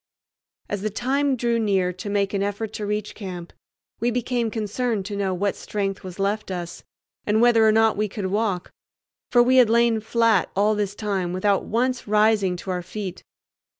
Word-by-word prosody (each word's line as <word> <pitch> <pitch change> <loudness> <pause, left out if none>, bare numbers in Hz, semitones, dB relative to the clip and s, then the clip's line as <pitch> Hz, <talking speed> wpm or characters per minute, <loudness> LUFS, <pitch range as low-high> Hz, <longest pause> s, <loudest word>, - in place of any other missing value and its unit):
As 205 -2 -3
the 215 - -1
time 270 +5 0
drew 235 -1 0
near 190 -4 +1
to 185 +3 -7
make 200 -1 0
an 200 - 0
effort 205 +2 -3
to 210 -2 -4
reach 210 0 -2
camp, 180 -4 -8 0.5
we 235 - +1
became 245 -1 -1
concerned 220 -1 -2
to 205 0 -4
know 200 -1 -1
what 195 +2 -1
strength 195 -2 -3
was 185 -1 -8
left 205 +2 -1
us, 175 -2 -6 0.4
and 210 +1 +3
whether 230 -2 +5
or - - +6
no 225 0 +4
we 210 +1 -1
could 205 0 -5
walk; 195 -2 -1 0.6
for 240 -1 +6
we 255 +2 +3
had 245 -3 +6
lain 235 -1 +3
flat 225 -3 +2
all 205 +2 +3
this 205 -1 -2
time 195 -5 -2
without 195 +1 +1
once 250 +2 -1
rising 210 -3 +3
to 185 +2 -5
our 180 -1 -2
feet. 185 0 -6
210 Hz, 185 wpm, -23 LUFS, 195-225 Hz, 0.6 s, or